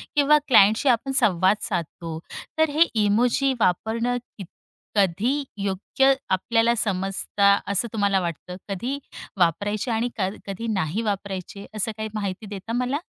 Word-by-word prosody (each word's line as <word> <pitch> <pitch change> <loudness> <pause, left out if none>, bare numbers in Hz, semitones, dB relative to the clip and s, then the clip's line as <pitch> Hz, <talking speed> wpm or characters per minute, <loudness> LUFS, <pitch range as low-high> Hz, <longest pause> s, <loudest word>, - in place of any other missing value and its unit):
किंवा 295 +1 +5
क्लायंटशी 220 +2 +5
आपण 245 +3 +1
संवाद 185 -2 +4
साधतो, 165 -1 -4 0.4
तर 315 0 +3
हे 300 +3 -1 0.2
इमोजी 245 +6 +2
वापरणं 230 +6 +1 0.2
कित 195 - -7 0.5
कधी 205 +9 +1 0.2
योग्य 200 +8 +2 0.2
आपल्याला 225 +5 +2
समजता 200 -1 +1 0.2
असं 200 +4 +1
तुम्हाला 200 -2 +2
वाटतं? 175 +1 -5
कधी 235 +8 -3 0.4
वापरायचे 205 +7 0
आणि 230 +2 0
क 190 -1 +1 0.2
कधी 200 +4 -5
नाही 190 +1 -1
वापरायचे, 200 -2 -4
असं 215 +1 -1
काही 220 0 -4
माहिती 205 -1 -4
देता 205 +2 -6
मला? 250 +4 0
210 Hz, 135 wpm, -24 LUFS, 190-240 Hz, 0.5 s, किंवा